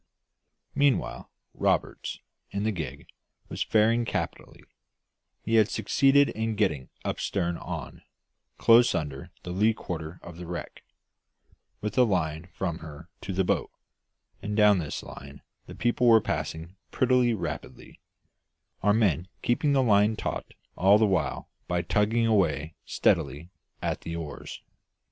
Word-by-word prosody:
Meanwhile, 140 -2 +1 0.2
Roberts, - - -1 0.3
in 100 0 -3
the 110 - +1
gig, 85 -7 -6 0.4
was - - -5
faring 115 +2 +3
capitally; - - -4 0.8
he 115 +1 +2
had 110 -1 +5
succeeded 135 +6 +3
in 110 0 -2
getting 80 -11 0 0.2
up - - -2
stern 85 -3 -1
on, - - -7 0.6
close 120 +1 +6
under 70 -4 -4
the 90 - -5
lee 105 +5 +2
quarter 85 -3 -6
of 85 -1 -10
the 90 -1 -8
wreck, 85 0 -6 1.0
with 105 +4 -2
a - - +8
line 85 -6 -1
from 85 -3 -3
her 80 +2 -11
to 95 - -5
the 95 +1 +1
boat, - - 0 0.7
and 105 +1 -3
down 105 -2 +6
this 75 -3 -4
line 70 +1 -11 0.2
the - - -9
people 120 +1 +1
were 115 -1 +8
passing 85 -2 -4
pretty 125 -2 +3
rapidly, 85 -5 -7 0.8
our 105 0 +4
men 95 -6 +2 0.2
keeping 140 +4 +2
the 135 -1 +4
line 105 -1 +4
taut - - -5 0.2
all 100 +3 +5
the 110 - +4
while 95 -3 -1 0.2
by 90 -1 0
tugging 110 +3 +2
away 80 -8 +1
steadily 75 +2 0 0.3
at - - -2
the 85 - -5
oars. 80 -3 -7
100 Hz, 140 wpm, -27 LUFS, 85-110 Hz, 1.0 s, a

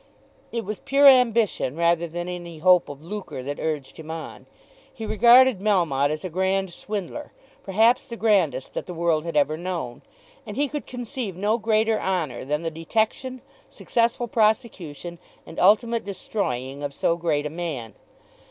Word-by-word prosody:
It 230 -3 -3
was 210 +1 -5
pure 280 +1 +2
ambition 235 - +4
rather 170 0 +2
than 175 +2 -5
any 175 -2 -6
hope 180 +2 +4
of 145 +2 -10
lucre 190 -8 -6
that 145 +2 -5
urged 150 -4 -3
him 160 0 -10
on. 160 0 -7 0.4
He 225 - -7
regarded 240 +1 +6
Melmotte 170 -9 +2
as 155 +3 -4
a - - -3
grand 190 +1 0
swindler, 210 - -6 0.3
perhaps 225 +6 +2
the 235 - -7
grandest 180 - +1
that - - -5
the 180 - -6
world 165 -2 +1
had 165 -2 -2
ever 150 +2 +2
known, 170 -8 -5 0.4
and - - -8
he 290 +1 +2
could 295 +1 -6
conceive 245 - -5
no 210 +5 0
greater 220 0 +1
honour 175 -9 -2
than 150 +3 -2
the 165 - -2
detection, 220 - -2 0.3
successful 235 +1 0
prosecution, 205 - -1 0.3
and - - -8
ultimate 230 +4 +3
destroying 140 - -4
of 140 -1 -4
so 165 - +1
great 160 -4 -1
a 150 - -3
man. 155 -9 -5
185 Hz, 160 wpm, -24 LUFS, 160-225 Hz, 0.4 s, regarded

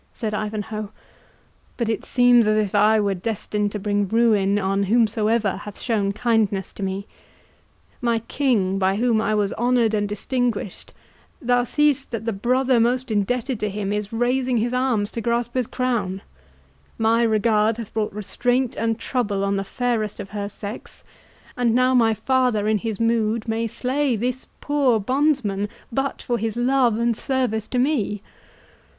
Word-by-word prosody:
said 220 -3 -4
Ivanhoe; 215 0 -4 0.9
"but 235 - -1
it 225 - -1
seems 245 -2 +4
as 215 0 +3
if 210 -3 0
I 215 +1 +4
were 200 -1 +1
destined 205 +1 -2
to - - -2
bring 205 0 0
ruin 210 -2 +3
on 195 0 0
whomsoever 220 -1 +2
hath 205 +1 -9
shown 210 -5 0
kindness 215 -3 0
to - - -10
me. 195 +1 -3 1.0
My 235 -1 +1
king, 225 -5 0
by 190 0 +2
whom 225 0 +2
I 215 0 0
was 205 -2 0
honoured 240 -2 +2
and 205 -1 0
distinguished, 225 -1 -3 0.4
thou 245 0 +2
seest 290 +1 +1
that 230 -2 -5
the 230 - -1
brother 250 +4 +2
most 250 +2 +1
indebted 235 +4 -1
to 210 - -1
him 200 0 -3
is 210 -1 -3
raising 250 +2 +1
his 235 +2 0
arms 250 -5 0
to 230 - -4
grasp 235 +1 -1
his 255 -3 0
crown;—my 225 0 -3
regard 220 -1 +2
hath 230 -3 -7
brought 220 -1 -1
restraint 245 +5 -1
and 225 0 -1
trouble 215 -6 -1
on 200 0 0
the 195 - -1
fairest 220 0 -2
of 195 - -7
her 205 -1 -4
sex;—and 225 +3 -6
now 255 +1 +3
my 225 -3 +4
father 250 -4 +1
in 215 -1 +2
his 220 -1 -4
mood 230 -1 +1
may 225 +1 -1
slay 260 +3 -1
this 250 +4 -3
poor 280 -6 +2
bondsman 245 -4 0 0.2
but 270 +3 -2
for 240 -1 -1
his 225 +1 -2
love 245 -2 +3
and 235 +1 +1
loyal - - -11
service 250 -5 -1
to 255 - -3
me! 240 -7 0
225 Hz, 160 wpm, -22 LUFS, 210-245 Hz, 1.0 s, seems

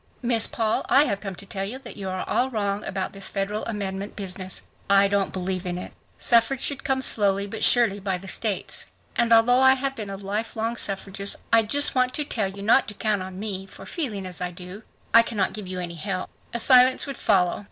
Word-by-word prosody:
"Miss 235 -2 +3
Paul, 220 -2 0
I 280 - +6
have 200 -9 -2
come 195 -2 -5
to 200 - -10
tell 195 0 -4
you 215 +6 -4
that 265 -3 -11
you 195 -2 -5
are 185 0 -4
all 255 - +1
wrong 205 -3 -2
about 190 -1 -3
this 195 -1 -4
federal 205 +2 -2
amendment 200 -2 -4
business. 185 -1 -6 0.3
I 200 0 +6
don't 200 -1 0
believe 185 0 -3
in 180 -1 -3
it. 180 - -7 0.2
Suffrage 235 +2 +3
should 285 -2 -1
come 265 -1 0
slowly 200 -4 +2
but 210 +2 -5
surely 230 -5 +4
by 190 -2 -1
the 190 +2 -11
states. 205 +2 -2 0.3
And 235 -1 +1
although 230 +2 +6
I 265 0 +7
have 270 +1 -2
been 215 -4 -6
a 195 - -5
life 205 +3 -3
long 225 +1 -2
suffragist, 200 -2 -2 0.2
I 225 - +7
just 285 +7 +3
want 255 -1 +1
to 300 - 0
tell 220 -8 0
you 200 +1 -9
not 230 +5 +4
to 210 - -7
count 210 -3 0
on 185 0 -7
me, 195 -2 -4
for - - -12
feeling 225 - -4
as 180 -1 -5
I 180 - -1
do, 180 +3 -10 0.3
I 230 - +9
cannot 215 -4 -1
give 210 -3 -6
you 185 0 -5
any 175 -1 -5
help." 185 +2 -4 0.2
A 235 - -3
silence 255 +1 +6
would 275 -2 -5
follow. 180 -6 +2
205 Hz, 225 wpm, -24 LUFS, 195-235 Hz, 0.3 s, I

